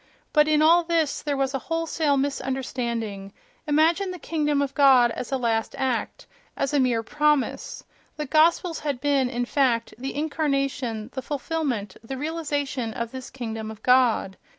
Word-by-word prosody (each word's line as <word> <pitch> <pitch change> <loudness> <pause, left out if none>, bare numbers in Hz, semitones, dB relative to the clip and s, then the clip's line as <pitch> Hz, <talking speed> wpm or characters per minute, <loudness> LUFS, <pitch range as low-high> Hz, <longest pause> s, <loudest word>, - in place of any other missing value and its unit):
But 300 -1 +5
in 305 0 +3
all 340 +2 +6
this 330 -3 0
there 290 -2 -2
was 270 0 0
a 270 - -1
wholesale 325 -2 0
misunderstanding: 240 -7 -3 0.3
imagine 325 +6 +3
the 365 - -5
"kingdom 300 -4 0
of 280 -1 -1
God" 260 -4 +6
as 250 - -6
a 270 - +1
last 225 -3 -1
act, 260 -3 -2 0.3
as 275 - -1
a 290 - +3
mere 245 -3 +2
promise! 300 +1 0 0.3
The 300 - -3
Gospels 325 +3 +3
had 285 -4 -3
been, 275 -2 +1
in 245 -1 -2
fact, 250 -3 +1
the 265 +1 -5
incarnation, 275 -6 -1
the 260 - -4
fulfilment, 275 - -3
the 265 +4 -6
realization 285 -6 -3
of 235 0 -4
this 260 -1 -7
"kingdom 225 -4 -5
of 220 0 -10
God." 250 -6 +3
270 Hz, 160 wpm, -25 LUFS, 245-300 Hz, 0.3 s, all